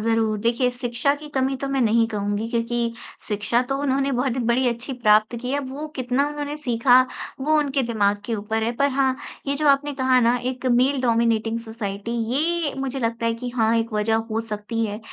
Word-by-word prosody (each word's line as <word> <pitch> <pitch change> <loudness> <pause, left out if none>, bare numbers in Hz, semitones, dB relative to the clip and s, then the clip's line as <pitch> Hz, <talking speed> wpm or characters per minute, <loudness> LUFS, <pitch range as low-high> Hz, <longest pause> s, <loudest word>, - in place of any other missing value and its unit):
ज़रूर, 225 -1 +1
देखिए 235 +3 +1
शिक्षा 245 +3 0
की 300 +1 -10
कमी 265 0 +1
तो 275 +1 -4
मैं 275 -1 0
नहीं 230 0 +3
कहूँगी, 205 +1 -2
क्योंकि 235 0 -1 0.3
शिक्षा 210 +3 +1
तो 270 +2 -2
उन्होंने 275 0 +1
बहुत 255 0 0
बड़ी 250 +2 +2
अच्छी 240 +3 -4
प्राप्त 215 -1 +3
की 250 - -4
है। 280 - 0
वो 275 +3 -6
कितना 255 +2 +1
उन्होंने 295 0 -4
सीखा, 250 -2 +4 0.4
वो 310 +3 +2
उनके 280 -2 +1
दिमाग़ 205 -3 +1
के 230 - -1
ऊपर 220 +2 -2
है। 230 - 0
पर 280 +2 +3
हाँ, 265 -1 +1 0.3
ये 280 - 0
जो 300 0 +2
आपने 285 +1 +3
कहा 260 -1 +3
ना 235 +1 +3
एक 255 0 -6
मेल 255 +3 +3
डोमिनेटिंग 230 -1 +1
सोसाइटी 220 -2 -5 0.2
ये 325 0 0
मुझे 270 0 -3
लगता 230 -1 -1
है 230 - +1
कि 245 +2 -5
हाँ 225 0 +3
एक 230 0 -2
वज़ह 210 +1 +1 0.2
हो 220 +1 0
सकती 225 +1 -3
है। 210 0 -4
240 Hz, 200 wpm, -23 LUFS, 225-270 Hz, 0.4 s, सीखा